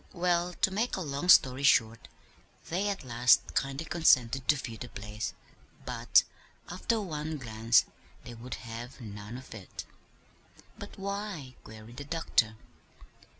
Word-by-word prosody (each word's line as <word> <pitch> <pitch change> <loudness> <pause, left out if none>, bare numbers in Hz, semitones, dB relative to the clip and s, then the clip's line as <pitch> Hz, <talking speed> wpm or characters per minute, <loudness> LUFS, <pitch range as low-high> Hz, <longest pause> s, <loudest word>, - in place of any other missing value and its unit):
"Well, 175 -1 +1
to 190 - +4
make 220 +6 0
a - - -3
long 150 +2 -3
story 130 -6 +6
short, 115 -5 +3 0.6
they 190 +5 0
at 200 -5 -3
last 120 -1 +3
kindly 135 +3 -1
consented 135 -6 +3
to 150 - +5
view 120 -4 -6
the 120 +2 -8
place; 105 +1 -6 0.5
but, - - +3 0.5
after 230 - 0
one 155 -5 -4
glance, 115 -3 +2 0.4
they 120 - -9
would 120 +2 -7
have 120 +2 -8
none 105 0 -8
of 130 - -11
it." 100 -4 -9 0.9
"But - - -10
why?" 200 -8 -5
queried 110 +2 -12
the 145 - -5
doctor. 140 -8 +1
130 Hz, 140 wpm, -30 LUFS, 115-170 Hz, 0.9 s, story